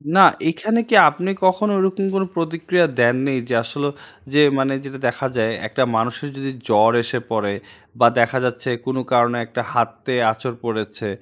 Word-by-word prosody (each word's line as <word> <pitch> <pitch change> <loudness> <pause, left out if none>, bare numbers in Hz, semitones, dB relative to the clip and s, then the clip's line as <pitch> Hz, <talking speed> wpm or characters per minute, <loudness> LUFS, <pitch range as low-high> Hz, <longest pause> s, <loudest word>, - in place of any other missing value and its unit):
না, 195 - +6 0.3
এখানে 220 +8 -1
কি 225 - +4
আপনি 175 +6 -4 0.2
কখনো 185 +3 +2
ঐরকম 190 +1 0
কোনো 190 0 +1
প্রতিক্রিয়া 170 +1 0
দেননি, 130 +3 +2 0.2
যে - - -1
আসলেও 145 +5 -3 0.4
যে 150 - +4 0.2
মানে 135 0 +1
যেটা 135 -1 -9
দেখা 125 +3 -2
যায়, 110 0 +1 0.2
একটা 130 - 0
মানুষের 125 +5 -2
যদি 135 0 -4 0.2
জ্বর 110 +2 +4
এসে 125 +1 -3
পড়ে, 105 -2 -1 0.5
বা 120 - +7
দেখা 120 +3 +2
যাচ্ছে 125 +1 -3 0.2
কোনো 130 0 -2
কারণে 120 0 +3
একটা 120 +2 -4
হাতে 115 +1 -1 0.2
আঁচড় 115 +2 -6
পড়েছে, 110 -2 -4
130 Hz, 165 wpm, -20 LUFS, 115-165 Hz, 0.5 s, বা